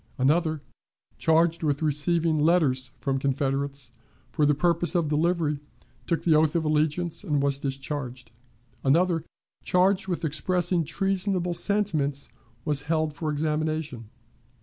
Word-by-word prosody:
Another, 155 Hz, +3 st, +1 dB, 0.6 s
charged 165 Hz, +1 st, +3 dB
with 150 Hz, -1 st, 0 dB
receiving 155 Hz, +2 st, +1 dB
letters 145 Hz, -6 st, +2 dB
from 135 Hz, -1 st, -1 dB
Confederates 135 Hz, -1 st, -1 dB, 0.4 s
for 150 Hz, -2 st, +2 dB
the 150 Hz, -, +3 dB
purpose 170 Hz, +3 st, +1 dB
of 165 Hz, -4 st, +1 dB
delivery, 155 Hz, -1 st, +1 dB, 0.5 s
took 170 Hz, -, 0 dB
the 165 Hz, -, +4 dB
oath 155 Hz, +1 st, +3 dB
of 165 Hz, -2 st, +1 dB
allegiance, 155 Hz, +3 st, 0 dB
and 150 Hz, -7 st, 0 dB
was 140 Hz, 0 st, 0 dB
discharged. 135 Hz, -3 st, -5 dB, 0.5 s
Another, 165 Hz, +3 st, +2 dB, 0.4 s
charged 190 Hz, +2 st, +2 dB
with 175 Hz, -3 st, -2 dB
expressing 175 Hz, +3 st, +1 dB
treasonable 185 Hz, +2 st, -1 dB
sentiments, 160 Hz, -9 st, 0 dB, 0.4 s
was 145 Hz, -2 st, +1 dB
held 155 Hz, -2 st, +1 dB
for 155 Hz, 0 st, -3 dB
examination. 150 Hz, -5 st, -2 dB
155 Hz, 125 wpm, -26 LUFS, 140-170 Hz, 0.6 s, the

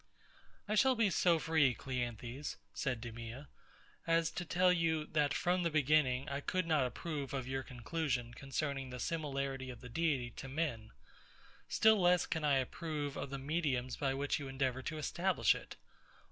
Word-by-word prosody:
I 210 Hz, -, 0 dB
shall 260 Hz, +5 st, +5 dB
be 225 Hz, -4 st, +3 dB
so 170 Hz, -1 st, +4 dB
free, 155 Hz, -6 st, +3 dB
CLEANTHES, 125 Hz, +1 st, -4 dB, 0.2 s
said 125 Hz, -5 st, -2 dB
DEMEA, 115 Hz, +3 st, -7 dB, 0.6 s
as 165 Hz, 0 st, +3 dB
to 180 Hz, -, -4 dB
tell 180 Hz, +2 st, +3 dB
you, 160 Hz, -3 st, +1 dB
that 150 Hz, -2 st, +1 dB
from 180 Hz, +4 st, +1 dB
the 170 Hz, -, +1 dB
beginning, 145 Hz, -3 st, +3 dB
I 140 Hz, 0 st, -2 dB
could 185 Hz, +4 st, 0 dB
not 155 Hz, -6 st, +3 dB
approve 140 Hz, +1 st, -4 dB
of 130 Hz, -2 st, -3 dB
your 135 Hz, 0 st, -2 dB
conclusion 125 Hz, -1 st, -2 dB
concerning 135 Hz, 0 st, -3 dB
the 125 Hz, 0 st, -6 dB
similarity 140 Hz, -4 st, -2 dB
of 120 Hz, -2 st, -8 dB
the 125 Hz, -, -9 dB
Deity 135 Hz, -4 st, 0 dB
to 135 Hz, -, -6 dB
men; 130 Hz, -7 st, -2 dB, 0.8 s
still 220 Hz, -2 st, +5 dB
less 180 Hz, 0 st, +4 dB
can 160 Hz, -2 st, -2 dB
I 145 Hz, -2 st, +4 dB
approve 145 Hz, +2 st, -3 dB
of -, -, -4 dB
the 140 Hz, -, -4 dB
mediums 135 Hz, -4 st, -1 dB
by 135 Hz, -2 st, 0 dB
which 140 Hz, +2 st, 0 dB
you 140 Hz, -, -5 dB
endeavour 130 Hz, -1 st, -1 dB
to 155 Hz, +4 st, -4 dB
establish 175 Hz, +5 st, +2 dB
it. -, -, -9 dB
140 Hz, 170 wpm, -35 LUFS, 130-165 Hz, 0.8 s, shall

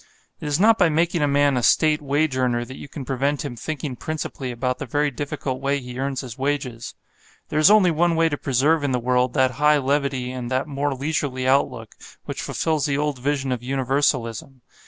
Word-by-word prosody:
It -, -, -6 dB
is 145 Hz, +2 st, 0 dB
not 220 Hz, +3 st, +5 dB
by 180 Hz, -3 st, +5 dB
making 165 Hz, +2 st, +1 dB
a 145 Hz, -, +3 dB
man 145 Hz, -1 st, +3 dB
a 125 Hz, -, +1 dB
State 155 Hz, +5 st, +3 dB
wage 145 Hz, 0 st, 0 dB
earner 120 Hz, -2 st, 0 dB
that 130 Hz, +2 st, -10 dB
you -, -, -9 dB
can 140 Hz, -1 st, -7 dB
prevent 140 Hz, +2 st, -1 dB
him 130 Hz, -4 st, -5 dB
thinking 145 Hz, +1 st, -5 dB
principally 145 Hz, -2 st, -5 dB
about 125 Hz, +1 st, -2 dB
the 145 Hz, -, -5 dB
very 145 Hz, +3 st, 0 dB
difficult 140 Hz, -1 st, -4 dB
way 140 Hz, +1 st, 0 dB
he 125 Hz, -1 st, -8 dB
earns 135 Hz, -1 st, -2 dB
his 130 Hz, -1 st, -9 dB
wages. 135 Hz, -4 st, -3 dB, 0.5 s
There 155 Hz, -, 0 dB
is 155 Hz, -, +7 dB
only 205 Hz, -4 st, +5 dB
one 170 Hz, +1 st, +2 dB
way 165 Hz, 0 st, +3 dB
to 155 Hz, -, -1 dB
preserve 145 Hz, +3 st, +1 dB
in 140 Hz, -2 st, 0 dB
the 125 Hz, -, +1 dB
world 125 Hz, +1 st, +1 dB
that 130 Hz, -2 st, +3 dB
high 150 Hz, 0 st, +5 dB
levity 135 Hz, -2 st, -1 dB
and 125 Hz, -2 st, -5 dB
that 130 Hz, +1 st, 0 dB
more 140 Hz, -1 st, -2 dB
leisurely 135 Hz, -2 st, -2 dB
outlook 125 Hz, -4 st, +1 dB, 0.3 s
which -, -, -5 dB
fulfils 155 Hz, -3 st, -1 dB
the 140 Hz, -1 st, 0 dB
old 145 Hz, -2 st, -1 dB
vision 135 Hz, 0 st, -1 dB
of 125 Hz, -2 st, -2 dB
universalism. 130 Hz, -1 st, -1 dB
140 Hz, 210 wpm, -23 LUFS, 130-150 Hz, 0.5 s, is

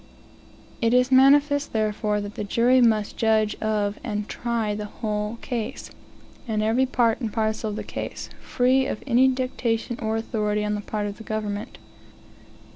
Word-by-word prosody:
It 230 Hz, +1 st, +3 dB
is 250 Hz, +1 st, +3 dB
manifest, 285 Hz, +2 st, +4 dB
therefore, 210 Hz, -1 st, 0 dB
that 205 Hz, 0 st, -6 dB
the -, -, -4 dB
jury 240 Hz, +5 st, +3 dB
must 215 Hz, -3 st, +2 dB
judge 220 Hz, -1 st, +2 dB
of 210 Hz, -1 st, -1 dB
and 210 Hz, -3 st, -3 dB
try 235 Hz, -3 st, -2 dB
the 210 Hz, 0 st, -4 dB
whole 210 Hz, +1 st, -3 dB
case, 235 Hz, -5 st, -4 dB, 0.6 s
and 215 Hz, -2 st, 0 dB
every 235 Hz, +5 st, +2 dB
part 240 Hz, -1 st, +1 dB
and 225 Hz, -3 st, -2 dB
parcel 220 Hz, 0 st, -1 dB
of 205 Hz, -, -4 dB
the -, -, -4 dB
case, -, -, -6 dB
free 260 Hz, +1 st, +2 dB
of -, -, -4 dB
any 260 Hz, 0 st, +4 dB
dictation 250 Hz, -2 st, -1 dB
or 220 Hz, -1 st, -1 dB
authority 210 Hz, -2 st, -1 dB
on 210 Hz, -, -1 dB
the 210 Hz, -, -2 dB
part 210 Hz, 0 st, -3 dB
of 205 Hz, 0 st, -5 dB
the 225 Hz, -, -10 dB
government. 215 Hz, +1 st, -4 dB
220 Hz, 165 wpm, -24 LUFS, 210-245 Hz, 0.6 s, manifest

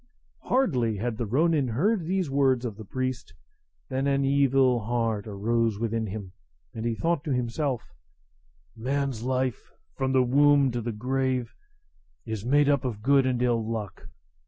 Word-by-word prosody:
Hardly 125 Hz, -, +1 dB
had 115 Hz, +2 st, -3 dB
the 115 Hz, -, -2 dB
ronin 150 Hz, +3 st, +2 dB
heard 170 Hz, -, +1 dB
these 185 Hz, -1 st, 0 dB
words 135 Hz, -3 st, +2 dB
of 110 Hz, -4 st, -4 dB
the 110 Hz, -, -9 dB
priest 130 Hz, +3 st, -4 dB, 0.5 s
than 135 Hz, +1 st, -1 dB
an 140 Hz, 0 st, +2 dB
evil 135 Hz, -2 st, +3 dB
heart 115 Hz, -2 st, -1 dB
arose 110 Hz, +1 st, 0 dB
within 115 Hz, 0 st, -2 dB
him, 100 Hz, -2 st, -6 dB, 0.4 s
and 115 Hz, 0 st, -5 dB
he 115 Hz, -, -1 dB
thought 165 Hz, +3 st, 0 dB
to 150 Hz, -, -2 dB
himself, 125 Hz, 0 st, -1 dB, 0.9 s
"Man's 135 Hz, 0 st, -2 dB
life, 130 Hz, -1 st, -2 dB, 0.2 s
from 130 Hz, 0 st, -1 dB
the 130 Hz, -1 st, +4 dB
womb 140 Hz, +1 st, +4 dB
to 120 Hz, 0 st, -3 dB
the 120 Hz, +1 st, -3 dB
grave, 125 Hz, +1 st, -1 dB, 0.7 s
is 110 Hz, -2 st, -4 dB
made 145 Hz, +4 st, +3 dB
up 140 Hz, -2 st, +2 dB
of 110 Hz, -5 st, -4 dB
good 135 Hz, 0 st, +4 dB
and 125 Hz, -2 st, 0 dB
of -, -, +3 dB
ill 115 Hz, -2 st, +1 dB
luck. 110 Hz, -3 st, -5 dB
125 Hz, 160 wpm, -26 LUFS, 115-140 Hz, 0.9 s, the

